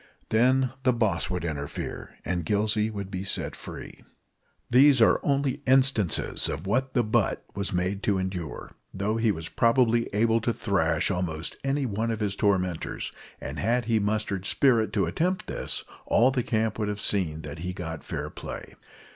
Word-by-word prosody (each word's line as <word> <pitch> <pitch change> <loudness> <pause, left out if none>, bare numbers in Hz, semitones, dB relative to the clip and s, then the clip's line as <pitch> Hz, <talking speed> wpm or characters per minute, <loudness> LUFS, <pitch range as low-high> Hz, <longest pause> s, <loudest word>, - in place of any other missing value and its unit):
Then 130 +3 +3
the 130 -1 +3
boss 115 -3 0
would 90 -2 -2
interfere, 75 -3 -5
and 90 -1 -1
Gillsey 105 +4 +1
would 100 -3 -6
be 95 -1 -3
set 100 - -2
free. - - -9 0.6
These 130 +2 +6
are 115 - +5
only 140 0 0
instances 130 - +3
of 80 - -4
what 130 +6 0
the 120 - +4
butt 110 - 0
was 100 0 -2
made 90 +2 -1
to 100 -2 +1
endure, 95 -4 -4 0.2
though 105 +3 -1
he 115 -1 +3
was 80 -3 -4
probably 115 +1 +3
able 115 +2 +2
to 115 +1 0
thrash 85 -6 +1
almost 85 -4 -2
any 135 0 0
one 110 0 -1
of 110 -1 -2
his 100 -2 -1
tormentors, 90 -5 0 0.3
and - - -6
had 120 +3 +1
he 115 -1 +2
mustered 105 -2 -1
spirit 120 -5 +3
to 100 -4 +2
attempt 170 - -1
this, - - -3 0.2
all 125 +3 +4
the 130 -1 0
camp 110 -2 -1
would 105 - 0
have 105 0 -3
seen 80 -7 0
that 75 +1 -7
he 90 +3 -3
got 80 -3 -6
fair - - -4
play. - - -8
105 Hz, 170 wpm, -27 LUFS, 90-120 Hz, 0.6 s, These